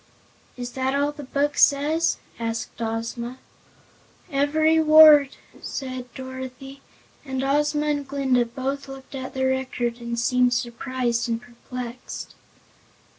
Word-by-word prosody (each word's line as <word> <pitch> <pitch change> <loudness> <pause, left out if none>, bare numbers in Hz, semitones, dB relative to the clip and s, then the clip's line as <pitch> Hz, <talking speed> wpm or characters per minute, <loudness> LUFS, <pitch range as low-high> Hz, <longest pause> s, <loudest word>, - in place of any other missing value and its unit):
'" - - -33
"Is 245 0 -5
that 265 +1 -1
all 285 +1 +1
the 295 0 -10
Book 285 +2 0
says?" 300 +4 +3 0.2
asked 230 0 -4
Ozma. 230 +2 -3 0.9
"Every 310 +3 +3
word," 310 -3 +8 0.2
said 255 -2 -5
Dorothy, 260 +1 -8 0.4
and 265 -2 -3
Ozma 295 +2 +1
and 290 -2 -1
Glinda 265 -3 +1
both 270 +3 -4
looked 270 0 -11
at 260 -1 -6
the 265 0 0
Record 255 -2 -1
and 235 0 -3
seemed 250 +1 +3
surprised 240 0 -2
and 230 0 0
perplexed. 245 +1 -8
260 Hz, 125 wpm, -24 LUFS, 245-280 Hz, 0.9 s, word